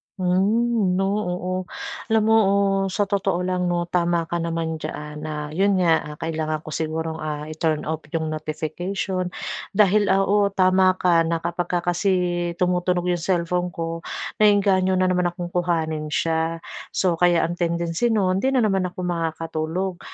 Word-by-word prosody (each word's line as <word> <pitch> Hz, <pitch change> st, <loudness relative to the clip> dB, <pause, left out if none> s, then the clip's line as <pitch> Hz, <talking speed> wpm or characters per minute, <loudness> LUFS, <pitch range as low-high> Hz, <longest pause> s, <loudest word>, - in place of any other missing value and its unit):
Hmm, 195 Hz, +2 st, +2 dB
'no, 195 Hz, -, +1 dB
oo. 185 Hz, -3 st, -2 dB, 0.5 s
Alam 220 Hz, -1 st, +3 dB
mo, 220 Hz, +1 st, +4 dB
oh, 200 Hz, 0 st, +2 dB
sa 205 Hz, +2 st, 0 dB
totoo 195 Hz, -3 st, 0 dB
lang 180 Hz, -1 st, 0 dB
'no, 175 Hz, 0 st, 0 dB
tama 170 Hz, -1 st, +1 dB
ka 170 Hz, -, 0 dB
naman 165 Hz, -1 st, -2 dB
diyan 150 Hz, 0 st, -6 dB
na 150 Hz, -1 st, -5 dB
'yon 195 Hz, +5 st, +2 dB
nga, 165 Hz, -4 st, +2 dB
kailangan 155 Hz, -1 st, -3 dB
ko 155 Hz, -, -8 dB
sigurong, 160 Hz, 0 st, -3 dB
ah, 150 Hz, -1 st, -4 dB
i-turn 155 Hz, -1 st, -1 dB
off 160 Hz, 0 st, -2 dB
'yong 160 Hz, 0 st, -2 dB
notification 175 Hz, +4 st, -3 dB, 0.5 s
dahil, 205 Hz, 0 st, +4 dB
oo, 200 Hz, +1 st, +3 dB
tama 185 Hz, 0 st, +4 dB
ka 175 Hz, -2 st, +3 dB
na 165 Hz, 0 st, -1 dB
kapagka 175 Hz, 0 st, -1 dB
kasi 195 Hz, +3 st, +1 dB, 0.4 s
tumutunog 180 Hz, -1 st, +1 dB
'yong 175 Hz, -, 0 dB
cellphone 180 Hz, 0 st, 0 dB
ko, 165 Hz, 0 st, -3 dB, 0.4 s
naeengganyo 195 Hz, -3 st, +4 dB
na 185 Hz, 0 st, +2 dB
naman 180 Hz, -1 st, +2 dB
akong 175 Hz, 0 st, -5 dB
kuhanin 160 Hz, -3 st, -1 dB
siya. 165 Hz, +1 st, -1 dB, 0.3 s
So, 175 Hz, -3 st, +1 dB
kaya 175 Hz, -2 st, +4 dB
ang 175 Hz, +2 st, -3 dB
tendency 170 Hz, +5 st, 0 dB
no'n 195 Hz, -4 st, +2 dB
hindi 265 Hz, +5 st, +1 dB
na 250 Hz, -, +4 dB
naman 195 Hz, -3 st, +1 dB
ako 180 Hz, +1 st, -7 dB
makakatulog. 165 Hz, +1 st, -2 dB
175 Hz, 155 wpm, -23 LUFS, 165-190 Hz, 0.5 s, mo